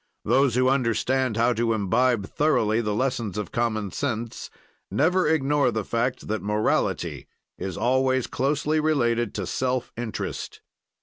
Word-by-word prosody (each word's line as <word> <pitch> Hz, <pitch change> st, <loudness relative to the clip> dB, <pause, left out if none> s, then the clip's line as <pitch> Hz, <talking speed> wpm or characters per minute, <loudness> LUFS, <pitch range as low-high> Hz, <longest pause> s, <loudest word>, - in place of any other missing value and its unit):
"Those 130 Hz, +1 st, +3 dB
who 130 Hz, 0 st, +3 dB
understand 130 Hz, -1 st, +1 dB
how 120 Hz, +2 st, +3 dB
to 115 Hz, 0 st, +1 dB
imbibe 110 Hz, +2 st, +1 dB
thoroughly 115 Hz, -5 st, +1 dB
the 105 Hz, -2 st, -1 dB
lessons 120 Hz, -5 st, -1 dB
of 105 Hz, -, -4 dB
common 110 Hz, -4 st, -1 dB
sense, 120 Hz, -5 st, -3 dB, 0.4 s
never 180 Hz, +4 st, +2 dB
ignore 145 Hz, -3 st, +2 dB
the 110 Hz, -3 st, -2 dB
fact 120 Hz, +2 st, -1 dB
that 110 Hz, +1 st, -2 dB
morality 105 Hz, +1 st, -1 dB, 0.3 s
is 95 Hz, -3 st, -4 dB
always 130 Hz, +1 st, +2 dB
closely 145 Hz, +4 st, 0 dB
related 120 Hz, -7 st, +1 dB
to 100 Hz, -, -2 dB
self 130 Hz, +2 st, -1 dB
interest. 120 Hz, -2 st, -5 dB
120 Hz, 135 wpm, -25 LUFS, 110-135 Hz, 0.4 s, Those